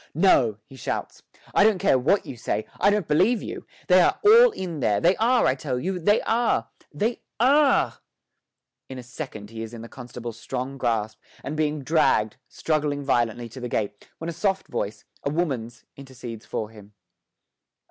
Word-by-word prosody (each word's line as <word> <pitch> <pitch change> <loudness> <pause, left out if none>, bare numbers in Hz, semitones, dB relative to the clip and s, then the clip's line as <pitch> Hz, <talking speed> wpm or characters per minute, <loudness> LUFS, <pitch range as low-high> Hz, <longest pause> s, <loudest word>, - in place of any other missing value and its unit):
'No!' 135 - +4
he 135 - -15
shouts. - - -4 0.3
'I - - +5
don't 215 -2 +4
care 130 - +3
what 165 +11 +2
you - - -7
say; 110 -2 -2
I 200 - +5
don't 205 -4 0
believe 200 +10 +3
you: - - -7 0.2
they 185 0 +6
are - - +2
all 465 +4 +8
in 180 - -5
there 105 -5 +2
they 175 - +4
are, 240 +3 +3
I - - +4
tell 130 -1 -3
you, 185 +5 -2
they 205 +6 +3
are 225 - +1 0.2
they 215 +11 -2 0.2
are!' 275 +4 +3 0.9
In 130 - -7
a 125 - -7
second 120 -5 -8
he 115 0 -7
is 115 +1 -7
in 115 - -8
the - - -8
constable's 120 -2 -8
strong 135 +1 -5
grasp 110 -3 -1 0.2
and 145 - -4
being 150 -2 -1
dragged, 130 -8 +2
struggling 150 -2 -1
violently, 120 -3 0
to 120 - -10
the 125 -1 -5
gate, 105 -2 -3
when 165 - -6
a 170 - -3
soft 195 +3 -1
voice, 100 +2 -4 0.2
a - - 0
woman's, 130 -8 -3
intercedes 125 -5 -9
for 110 0 -4
him. 105 -1 -15
135 Hz, 180 wpm, -25 LUFS, 115-180 Hz, 0.9 s, all